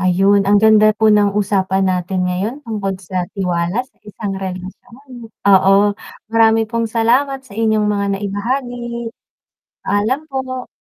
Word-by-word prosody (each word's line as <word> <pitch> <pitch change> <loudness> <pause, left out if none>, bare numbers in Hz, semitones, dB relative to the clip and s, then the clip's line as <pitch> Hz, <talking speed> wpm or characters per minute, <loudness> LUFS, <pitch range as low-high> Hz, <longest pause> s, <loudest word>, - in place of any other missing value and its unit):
Ayun, 195 +2 +3
ang 205 - +5
ganda 215 -1 +5
po 220 -1 +4
ng 205 -1 +2
usapan 195 -2 0
natin 180 0 -1
ngayon 215 +11 -3
tungkol 200 -4 -3
sa 180 -1 -4
tiwala 180 +4 -1
sa 270 - -32
isang 210 -1 -6
relasyon. 230 +7 -9 0.2
Oo, 195 +1 +5 0.4
marami 225 0 +4
pong 230 0 -2
salamat 265 +4 +1
sa 205 - -16
inyong 220 -1 +1
mga 200 -1 0
naibahagi. 240 +5 -3 1.0
Paalam 210 +8 0
po. 260 -2 -5
210 Hz, 135 wpm, -17 LUFS, 195-230 Hz, 1.0 s, ang